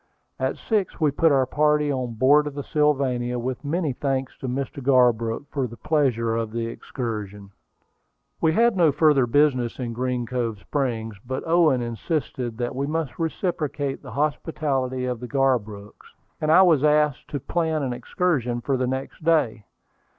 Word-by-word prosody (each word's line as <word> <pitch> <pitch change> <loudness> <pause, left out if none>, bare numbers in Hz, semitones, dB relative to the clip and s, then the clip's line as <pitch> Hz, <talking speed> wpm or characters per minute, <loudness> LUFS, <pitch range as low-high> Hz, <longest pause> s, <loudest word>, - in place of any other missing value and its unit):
At - - -1
six 210 -5 -1
we 155 -3 +3
put 160 +3 +3
our 135 -2 +3
party 150 +1 +2
on 125 -3 -3
board 145 +5 +4
of 145 - -6
the 145 - -4
Sylvania, 130 -5 +1
with 125 +2 -4
many 155 -1 -1
thanks 135 0 -2
to 130 - -5
Mr. 135 +2 -4
Garbrook 125 -1 +2
for 135 -3 -1
the 115 0 -11
pleasure 130 -7 +1
of 115 -1 -2
the 115 0 -2
excursion. 105 -5 -6 0.9
We 160 -1 +3
had 235 +3 +3
no 170 -5 +4
further 145 -3 +3
business 130 -2 +2
in 120 -3 -4
Green 125 0 -2
Cove 115 -3 -2
Springs; 115 -4 -3
but 130 +2 -4
Owen 160 -7 +3
insisted 120 -1 -3
that 120 +1 -3
we 140 +2 -2
must 155 -5 -3
reciprocate 155 -4 -2
the 125 -5 -10
hospitality 140 -3 -1
of 125 -2 -3
the 125 - -7
Garbrooks, 115 -7 -2 0.3
and 155 0 +1
I 185 +4 +8
was 160 -6 +4
asked 150 -2 +2
to 145 - -4
plan 160 +1 -1
an 130 -2 -1
excursion 125 -1 -1
for 135 +2 -1
the 130 0 0
next 130 +4 -5
day. 150 -10 +1
135 Hz, 165 wpm, -24 LUFS, 120-150 Hz, 0.9 s, I